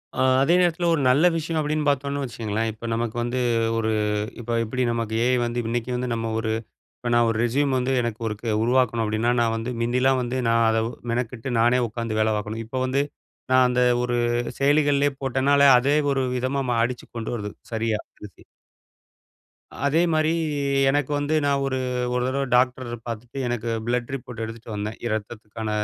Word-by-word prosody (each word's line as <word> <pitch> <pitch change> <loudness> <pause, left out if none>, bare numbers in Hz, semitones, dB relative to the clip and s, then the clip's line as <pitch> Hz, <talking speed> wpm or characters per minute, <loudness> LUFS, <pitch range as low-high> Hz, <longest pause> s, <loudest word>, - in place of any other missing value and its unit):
அ - - -9 0.2
அதே 160 +6 +4
நேரத்தில 175 -1 +1
ஒரு 155 - +1
நல்ல 140 +7 +4
விஷயம் 165 0 -3
அப்படின்னு 150 0 -1
பார்த்தோம்னு 140 0 0
வச்சுக்கங்களேன், 115 -3 -2
இப்ப 110 +2 -10
நமக்கு 115 0 -2
வந்து 120 +2 -2 0.4
ஒரு 110 -1 0 0.5
இப்ப 120 0 -5
எப்படி 130 +3 -2
நமக்கு 115 -1 -2
ஏ - - +2
ஐ - - +4
வந்து 120 +1 -2
இன்னைக்கு 120 +1 -2
வந்து 125 0 -2
நம்ம 115 0 -2
ஒரு 110 -1 -1 0.5
இப்ப 120 - -3
நான் 120 0 +4
ஒரு 115 - -1
ரெஸ்யூம் 135 +3 +1
வந்து 125 +1 0
எனக்கு 120 -2 -3
ஒருக்கு 110 +2 -5
உருவாக்கணும் 120 -1 +2
அப்படின்னா, 110 +2 0
நான் 115 -1 +2
வந்து 115 +2 -4
மிந்திலாம் 125 +2 +2
வந்து 125 +1 -3
நான் 115 0 +3
அதை 110 0 +2 0.3
மெனக்கட்டு 120 +1 -3
நானே 120 +2 +4
உட்காந்து 110 0 -3
வேலை 110 0 +3
பார்க்கணும். 110 +1 -4
இப்ப 115 - -7
வந்து 135 +2 +1 0.5
நான் 130 0 +5
அந்த 125 0 +1 0.2
ஒரு 120 0 0 0.4
செயலிகள்லே 145 0 +3
போட்டேனாலே, 140 +1 +3
அதே 140 +4 +2 0.2
ஒரு 135 -1 0
விதமா 130 +2 -1
மா 120 - +1
அடிச்சுக் 120 0 -6
கொண்டு 115 0 -4
வருது 105 -2 -5 0.2
சரியா 110 -1 0 0.3
ரெஸ்யூம். 100 -5 -13 1.4
அதே 150 +4 +3
மாரி 155 0 +2 0.6
எனக்கு 145 0 0
வந்து 145 +2 0
நான் 140 -1 +1
ஒரு 135 -1 -1 0.4
ஒரு 125 - 0
தடவை 135 +1 -1
டாக்டரு 125 -1 +1
பார்த்துட்டு 115 +3 -7
எனக்கு 120 -1 -2 0.2
பிளட் 120 +1 -1
ரிப்போர்ட் 125 -3 -8
எடுத்துட்டு 115 +1 -8
வந்தேன். 105 +2 -4
இரத்தத்துக்கான 110 0 -5
120 Hz, 175 wpm, -24 LUFS, 115-135 Hz, 1.4 s, நான்